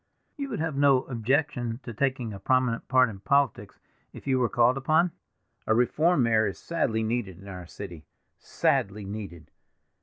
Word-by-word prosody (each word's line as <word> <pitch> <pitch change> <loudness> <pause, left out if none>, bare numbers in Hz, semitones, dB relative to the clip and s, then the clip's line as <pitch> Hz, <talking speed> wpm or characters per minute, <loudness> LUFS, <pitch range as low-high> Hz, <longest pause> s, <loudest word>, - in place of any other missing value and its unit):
You 280 -1 -5
would - - -4
have 160 -2 -2
no 140 -2 +4
objection 125 -1 -1
to 120 - -7
taking 130 -2 -1
a 100 - -8
prominent 125 +2 +1
part 130 -1 +5
in 100 -4 -8
politics, 140 +5 0 0.4
if - - -11
you 130 -2 +2
were 120 -2 +2
called 120 +1 +3
upon? 155 +6 +2 0.6
A 110 - +3
reform 150 +5 +3
mayor 110 -2 +3
is 95 - -5
sadly 115 -10 -1
needed 110 -5 -2
in 95 +2 -13
our 90 -3 -8
city—sadly 95 +3 -3
needed. 95 -6 -8
120 Hz, 160 wpm, -27 LUFS, 105-135 Hz, 0.6 s, part